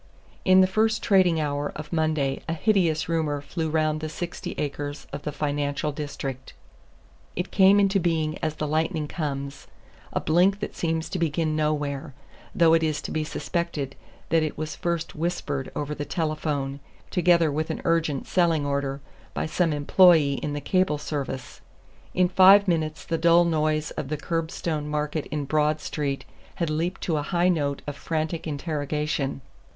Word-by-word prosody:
In 185 0 +6
the - - +6
first 220 +3 +1
trading 185 -5 +4
hour 145 -1 -1
of 150 +2 -7
Monday 155 -4 0
a - - +1
hideous 165 -4 +2
rumor 160 -3 0
flew 160 +2 -3
round 155 -1 +1
the 155 0 -4
sixty 175 +2 -5
acres 145 0 -4
of - - -4
the 150 - -4
financial 145 0 -1
district. 140 -3 -6 0.8
It 180 - -3
came 195 +1 +6
into 195 0 +3
being 160 -3 0
as 155 -1 -2
the 155 0 -3
lightning 155 +1 0
comes, 140 -3 -4 0.4
a - - 0
blink 180 +5 +3
that 210 - -5
seems 165 -1 -1
to 185 - -3
begin 160 -1 0
nowhere; 150 -2 -1 0.4
though 165 -2 +5
it 165 - +4
is 155 -2 0
to - - -5
be 155 - -1
suspected 150 -2 -3 0.3
that 165 0 +3
it 155 -1 -2
was 155 0 -4
first 170 -1 -2
whispered 150 -4 -3
over 150 0 -2
the 145 - -4
telephone 150 -4 -2 0.3
together 175 -3 +4
with 155 +2 -2
an - - -3
urgent 165 -5 +1
selling 165 -5 +2
order 140 -1 -2 0.3
by - - -1
some 165 +1 +1
employee 150 -1 +5
in 145 - -3
the 145 - -3
cable 185 -1 +1
service. 140 -3 -5 0.5
In 180 0 +4
five 190 +2 +7
minutes 155 -3 -1
the 165 -1 -1
dull 170 +1 +5
noise 155 -2 0
of 150 - -5
the 155 +2 -2
curbstone 160 -1 -2
market 150 0 -2
in 150 -2 -3
Broad 150 +1 +1
Street 140 -3 -3 0.3
had 170 -3 -1
leaped 165 +4 -2
to 160 -3 0
a - - 0
high 175 +4 +1
note 145 -5 0
of 145 - -5
frantic 160 +2 -3
interrogation. 150 -2 -2
155 Hz, 165 wpm, -25 LUFS, 145-170 Hz, 0.8 s, five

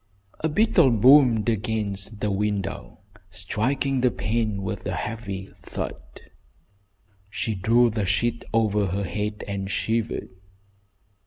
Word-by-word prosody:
A 160 - 0
beetle 170 -3 +4
boomed 120 -1 +6
against 105 -2 -2
the 105 - 0
window, 100 0 -3 0.3
striking 125 +9 -1
the 125 - +4
pane 110 -3 -1
with 95 - -4
a - - -2
heavy 100 -4 -5
thud. - - -5 1.3
She 110 +1 -2
drew 115 +5 +3
the 105 -3 -1
sheet 115 +4 0
over 105 -3 +2
her 100 +3 -2
head 105 +3 -3
and 100 -1 -3
shivered. 115 +2 -1
105 Hz, 115 wpm, -25 LUFS, 100-120 Hz, 1.3 s, boomed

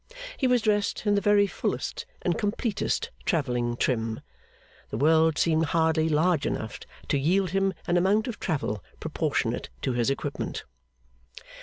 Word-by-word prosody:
He 265 - +1
was 250 -2 +3
dressed 210 -1 +1
in 205 - +3
the 200 - +2
very 205 +1 +4
fullest 465 - -3 0.2
and 175 - +1
completest 215 - -1
travelling 125 - 0
trim. 115 -3 -1 0.7
The - - -4
world 160 +3 +4
seemed 160 -1 +3
hardly 160 0 +2
large 160 0 +2
enough 110 -1 -4 0.3
to 140 - +2
yield 180 +5 +2
him 195 0 +1
an 175 - +2
amount 200 +6 +2
of 240 - -5
travel 135 - -2 0.2
proportionate - - -1
to 130 - 0
his 120 +1 +1
equipment. 135 - -3
165 Hz, 145 wpm, -27 LUFS, 140-205 Hz, 0.7 s, very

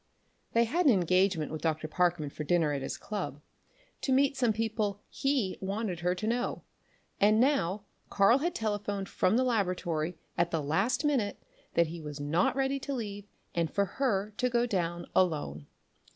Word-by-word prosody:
They 230 - +5
had 330 +9 +1
an - - +8
engagement 180 -4 +2
with 155 -1 -5
Dr. 155 -1 -1
Parkman 170 -3 +1
for 150 - -5
dinner 160 -1 +2
at 140 - -2
his 135 - -4
club, 150 -10 -4 0.6
to 270 - -1
meet 275 +1 +3
some 245 -4 +2
people 215 -2 -1
he 270 -9 0
wanted 195 -2 -2
her 180 +1 +1
to 185 - -4
know, 240 +2 -1 0.6
and 215 +2 +5
now 220 - +2 0.3
Karl 205 +6 +5
had 340 +4 -1
telephoned 205 -2 -2
from 195 +5 +2
the 255 - +3
laboratory 180 -8 0 0.2
at 170 0 +3
the 165 - 0
last 195 - +1
minute 255 -9 +1 0.4
that 170 - +5
he 165 +1 -7
was 150 -1 -7
not 155 +9 +1
ready 270 0 0
to 280 +1 -4
leave 205 -4 -5 0.3
and 170 -2 0
for 200 - +2 0.2
her 210 -5 +1
to 250 -1 +1
go 240 -1 +2
on - - 0
down 175 -3 -1
alone. 145 - +1
195 Hz, 180 wpm, -30 LUFS, 170-235 Hz, 0.6 s, an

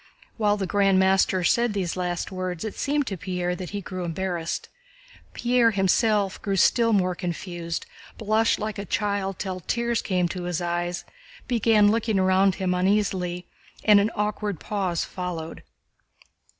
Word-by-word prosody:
While 210 -2 +2
the 195 - -2
Grand 195 0 +3
Master 190 -1 +3
said 235 +4 +2
these 185 -4 -2
last 180 +1 -2
words 185 -2 -4
it 220 - -4
seemed 290 0 0
to 195 -5 -4
Pierre 180 0 -2
that 180 -1 -6
he 205 -1 -4
grew 185 0 -5
embarrassed. 170 -1 -3 0.7
Pierre 240 -1 +3
himself 200 0 +1
grew 200 -2 -1
still 230 +4 +4
more 185 -4 +2
confused, 175 -1 -4 0.3
blushed 220 +1 +2
like 215 -1 -4
a 200 - -4
child 200 -2 -1
till 185 -2 -4
tears 235 +5 -1
came 180 -3 0
to 180 0 -5
his 175 -2 -1
eyes, 175 0 -2 0.4
began 220 -3 +4
looking 220 -2 0
about 190 0 +3
him 185 -1 -1
uneasily, 180 -2 0 0.4
and 210 -2 +7
an 205 +2 +2
awkward 210 -3 -2
pause 190 -5 -2
followed. 175 -3 -5
190 Hz, 150 wpm, -25 LUFS, 180-210 Hz, 0.7 s, and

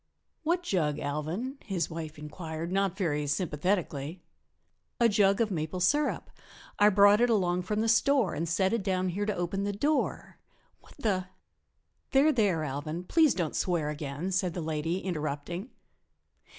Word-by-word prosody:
"What 345 +3 0
jug, 155 - 0
Alvan?" 165 - -3
his 180 -7 -2
wife 160 -1 -6
inquired, 160 +2 -6
not 195 -1 0
very 150 -6 -1
sympathetically. 160 0 -1 0.8
"A 235 - +6
jug 200 -1 +3
of 225 -2 +1
maple 160 0 -3
sirup 290 +11 +1 0.5
I 205 +1 +7
brought 205 +2 +6
it 245 - +4
along 180 -5 +2
from 210 +4 -1
the 225 - +1
store 230 -2 +3
and 165 +1 -2
set 190 +4 +1
it 230 - +1
down 185 -1 0
here 205 +4 -2
to 210 - 0
open 175 +3 -2
the 205 - -1
door. 290 +9 -1 0.4
What - - -19
the 195 -8 -1 0.4
" - - -48
"There, 280 +3 +5
there, 200 - +1
Alvan, 155 +4 -4
please 315 - +3
don't 170 -5 -2
swear 165 -5 0
again," 150 +4 -4
said 185 -2 0
the - - -2
lady, 160 +3 -2
interrupting. 170 - -4
185 Hz, 160 wpm, -29 LUFS, 160-210 Hz, 0.8 s, I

